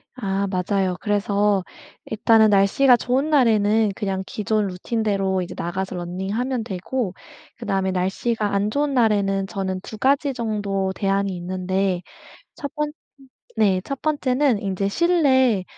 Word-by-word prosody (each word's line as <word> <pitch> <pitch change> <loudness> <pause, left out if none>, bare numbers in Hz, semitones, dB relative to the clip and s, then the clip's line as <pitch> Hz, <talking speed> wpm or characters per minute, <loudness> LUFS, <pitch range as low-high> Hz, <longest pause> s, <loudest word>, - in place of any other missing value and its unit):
아. 200 -4 -1
맞아요. 190 0 0
그래서 205 -1 +1 0.4
일단은 220 0 +4
날씨가 210 +6 +5
좋은 260 +6 0
날에는 220 -6 +3
그냥 195 -3 -2
기존 210 0 -1
루틴대로 195 -1 -1
이제 180 0 -6
나가서 185 +2 -3
러닝하면 200 +8 -3
되고 200 +1 -3 0.4
그다음에 195 -4 -1
날씨가 200 +3 -1
안 200 +2 +1
좋은 285 +1 0
날에는 200 -5 +2
저는 190 -1 -3
2 215 - -9
가지 275 +4 +2
정도 205 -5 -2
대안이 195 -1 0
있는데 185 +1 -1 0.5
1 285 +1 -7
번 300 -1 -2 0.7
네 195 -4 +3
1 275 -1 -5
번째는 280 -4 +1
인제 195 0 -1
실내 260 - +3
205 Hz, 270 characters per minute, -22 LUFS, 190-240 Hz, 0.7 s, 날씨가